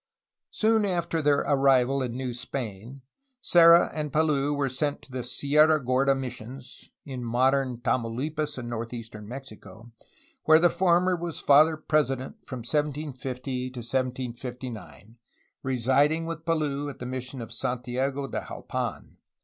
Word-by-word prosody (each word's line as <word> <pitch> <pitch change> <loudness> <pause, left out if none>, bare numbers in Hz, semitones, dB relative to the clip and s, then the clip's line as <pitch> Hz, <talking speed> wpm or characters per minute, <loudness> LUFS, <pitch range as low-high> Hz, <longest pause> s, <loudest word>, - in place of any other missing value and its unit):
Soon 220 0 +2
after 170 -4 -1
their 145 -1 +3
arrival 135 -1 +3
in 125 -1 -3
New 130 -2 -3
Spain, 120 0 -6 0.4
Serra 170 -6 +6
and 150 -2 -3
Palou 145 -2 +2
were 145 -1 0
sent 145 +3 -2
to 140 - -17
the 130 0 -3
Sierra 150 +5 +3
Gorda 135 +1 +2
missions 125 0 -8 0.2
(in 130 -3 -6
modern 130 +2 +1
TamauHpas, 145 +6 -2
in 125 -2 -5
northeastern 115 -2 -6
Mexico), 120 -2 -10 0.5
where 155 0 +7
the 170 +1 +4
former 180 0 +3
was 170 -1 -5
Father 155 +3 +5
President 135 -4 0
from 130 -2 -6
1750 130 -2 -3
to 130 - -13
1759, 120 -3 -5 0.4
residing 135 +5 +2
with 165 -1 -6
Palou 145 -3 -1
at 140 - -9
the 125 - -7
mission 130 +1 -5
of 115 -1 -7
Santiago 125 +4 -2
de - - -3
Jalpan. - - -5
135 Hz, 135 wpm, -27 LUFS, 125-150 Hz, 0.5 s, where